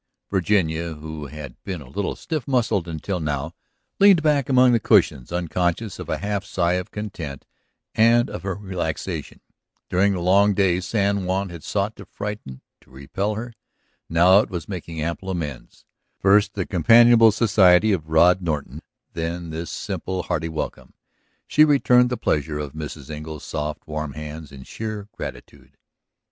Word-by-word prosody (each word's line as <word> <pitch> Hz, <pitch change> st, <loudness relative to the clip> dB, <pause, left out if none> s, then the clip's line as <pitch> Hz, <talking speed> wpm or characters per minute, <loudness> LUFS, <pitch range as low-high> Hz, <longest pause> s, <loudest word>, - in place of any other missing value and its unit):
Virginia, 85 Hz, -4 st, 0 dB
who 75 Hz, -1 st, -7 dB
had 75 Hz, -4 st, -10 dB
been 95 Hz, -3 st, -4 dB
a 70 Hz, -, -12 dB
little 95 Hz, +10 st, -3 dB
stiff 155 Hz, -7 st, -4 dB
muscled 120 Hz, -9 st, +1 dB
until 85 Hz, +3 st, -3 dB
now, 75 Hz, 0 st, -3 dB, 0.5 s
leaned 195 Hz, -5 st, +6 dB
back 145 Hz, -4 st, +2 dB
among 130 Hz, -1 st, +5 dB
the 120 Hz, -, +3 dB
cushions 80 Hz, -, +2 dB
unconscious 90 Hz, +4 st, -1 dB
of -, -, -7 dB
a -, -, 0 dB
half 100 Hz, -1 st, -2 dB
sigh 85 Hz, -1 st, 0 dB
of 90 Hz, 0 st, -2 dB
content 85 Hz, -10 st, -7 dB, 0.5 s
and 115 Hz, +2 st, +4 dB
of -, -, -7 dB
her 95 Hz, -1 st, -3 dB
relaxation. 95 Hz, -3 st, -5 dB, 0.5 s
During 100 Hz, +2 st, +3 dB
the 90 Hz, -, -2 dB
long 100 Hz, +3 st, +4 dB
day 90 Hz, -3 st, +2 dB
San 100 Hz, 0 st, 0 dB
Juan 95 Hz, +1 st, -1 dB
had 85 Hz, -3 st, -10 dB
sought 105 Hz, +2 st, -2 dB
to -, -, -10 dB
frighten, 100 Hz, -11 st, -7 dB, 0.2 s
to -, -, -26 dB
repel 85 Hz, +11 st, -3 dB
her. 120 Hz, +2 st, -6 dB, 0.6 s
Now 90 Hz, +4 st, +6 dB
it -, -, -1 dB
was 90 Hz, -3 st, -5 dB
making 85 Hz, -4 st, -6 dB
ample 85 Hz, +4 st, -3 dB
amends: 75 Hz, -8 st, -6 dB, 0.3 s
first 100 Hz, +2 st, +3 dB
the 95 Hz, -3 st, -2 dB
companionable 115 Hz, +5 st, +6 dB
society 105 Hz, -2 st, +4 dB
of 80 Hz, -5 st, -2 dB
Rod 90 Hz, +4 st, +5 dB
Norton, 75 Hz, -5 st, -3 dB, 0.3 s
then 85 Hz, 0 st, -4 dB
this 80 Hz, +1 st, -5 dB
simple, 95 Hz, -1 st, -4 dB
hearty 80 Hz, -, -2 dB
welcome. 80 Hz, -1 st, -6 dB, 0.5 s
She 150 Hz, -, +5 dB
returned 125 Hz, -4 st, +4 dB
the 125 Hz, -, -2 dB
pressure 75 Hz, 0 st, -1 dB
of 75 Hz, -2 st, -5 dB
Mrs. 75 Hz, -1 st, -7 dB
Engle's 75 Hz, 0 st, -7 dB
soft, 75 Hz, 0 st, -4 dB
warm 75 Hz, -2 st, -4 dB
hands 75 Hz, 0 st, -8 dB
in 65 Hz, -2 st, -11 dB
sheer 110 Hz, +4 st, -6 dB
gratitude. 65 Hz, +2 st, -10 dB
90 Hz, 160 wpm, -23 LUFS, 80-105 Hz, 0.6 s, leaned